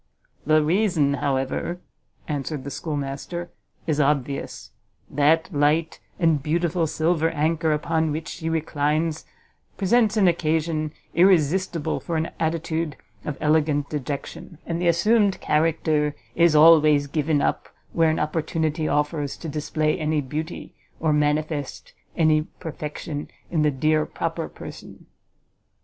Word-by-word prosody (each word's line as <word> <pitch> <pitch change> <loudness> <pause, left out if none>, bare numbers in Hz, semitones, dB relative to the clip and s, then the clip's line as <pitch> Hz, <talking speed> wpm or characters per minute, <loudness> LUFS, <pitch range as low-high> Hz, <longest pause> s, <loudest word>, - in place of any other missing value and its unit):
"The 155 0 +4
reason, 165 -4 +2
however," 140 +5 -1 0.5
answered 145 -1 -3
the 140 - -6
schoolmaster, 150 +4 -4 0.3
"is 155 -2 0
obvious; 140 - -1 0.4
that 160 +5 +2
light 150 +3 +1 0.2
and 165 -4 +3
beautiful 165 +2 0
silver 160 +1 +1
anchor 160 +1 0
upon 160 +1 0
which 160 +2 -4
she 160 - -4
reclines 155 0 -1 0.5
presents 215 +2 +2
an 195 -3 +5
occasion 160 -2 0 0.2
irresistible 170 -2 +2
for 165 - -3
an 160 +1 -2
attitude 160 -1 -2 0.3
of 150 - -4
elegant 150 -2 +1
dejection; 145 +3 -5
and 170 +1 -3
the 175 - +1
assumed 200 +4 +3
character 155 -1 +1 0.2
is 170 -2 +4
always 150 -2 +6
given 150 +1 0
up - - -1 0.2
where 165 -1 +3
an 155 - 0
opportunity 155 0 -1
offers 150 -1 -1
to 165 - -7
display 155 +2 -1
any 155 -1 0
beauty, 150 +4 -5 0.3
or 155 -1 +1
manifest 150 -1 -1 0.2
any 155 -2 +4 0.2
perfection 150 -1 -6 0.2
in 160 - +1
the 150 - +4
dear 155 +3 +1
proper - - -3
person!" - - -11
155 Hz, 125 wpm, -24 LUFS, 150-165 Hz, 0.5 s, always